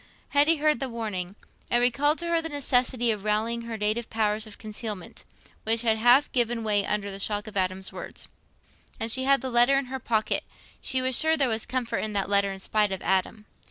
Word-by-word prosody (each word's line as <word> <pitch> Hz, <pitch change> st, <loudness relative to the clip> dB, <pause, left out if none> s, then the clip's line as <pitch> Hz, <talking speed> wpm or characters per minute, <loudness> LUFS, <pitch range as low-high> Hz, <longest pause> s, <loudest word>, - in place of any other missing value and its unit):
Hetty 295 Hz, +3 st, +4 dB
heard 300 Hz, -3 st, +1 dB
the 270 Hz, -, -3 dB
warning. 205 Hz, -5 st, -5 dB, 0.3 s
It 240 Hz, -, +3 dB
recalled 275 Hz, +6 st, +2 dB
to 340 Hz, -, -3 dB
her 335 Hz, -1 st, +2 dB
the 325 Hz, -, -5 dB
necessity 250 Hz, -4 st, +1 dB
of 210 Hz, -2 st, -4 dB
rallying 220 Hz, +2 st, 0 dB
her 225 Hz, -1 st, -4 dB
native 215 Hz, +2 st, -2 dB
powers 215 Hz, 0 st, 0 dB
of 215 Hz, -, -8 dB
concealment, 215 Hz, -3 st, -6 dB, 0.4 s
which 225 Hz, +1 st, +1 dB
had 220 Hz, -2 st, +2 dB
half 245 Hz, +5 st, +5 dB
given 240 Hz, -2 st, 0 dB
way 205 Hz, -2 st, +2 dB
under 200 Hz, 0 st, -2 dB
the 195 Hz, -, -7 dB
shock 205 Hz, +1 st, -1 dB
of 215 Hz, -1 st, -11 dB
Adam's 190 Hz, 0 st, -2 dB
words. -, -, -7 dB, 0.7 s
And 225 Hz, 0 st, 0 dB
she 260 Hz, +2 st, +1 dB
had 275 Hz, -2 st, +4 dB
the 260 Hz, 0 st, -4 dB
letter 240 Hz, +3 st, +5 dB
in 275 Hz, -, -1 dB
her 265 Hz, -, -3 dB
pocket: 220 Hz, -3 st, 0 dB, 0.4 s
she 260 Hz, 0 st, +1 dB
was 260 Hz, -1 st, +2 dB
sure 320 Hz, 0 st, +3 dB
there 275 Hz, -3 st, +3 dB
was 220 Hz, -1 st, -1 dB
comfort 255 Hz, -2 st, -2 dB
in 215 Hz, -1 st, -3 dB
that 200 Hz, -1 st, -1 dB
letter 200 Hz, -1 st, +3 dB
in 195 Hz, -, -7 dB
spite 210 Hz, +1 st, +1 dB
of 190 Hz, -, -5 dB
Adam. 190 Hz, +3 st, 0 dB
225 Hz, 215 wpm, -26 LUFS, 210-255 Hz, 0.7 s, half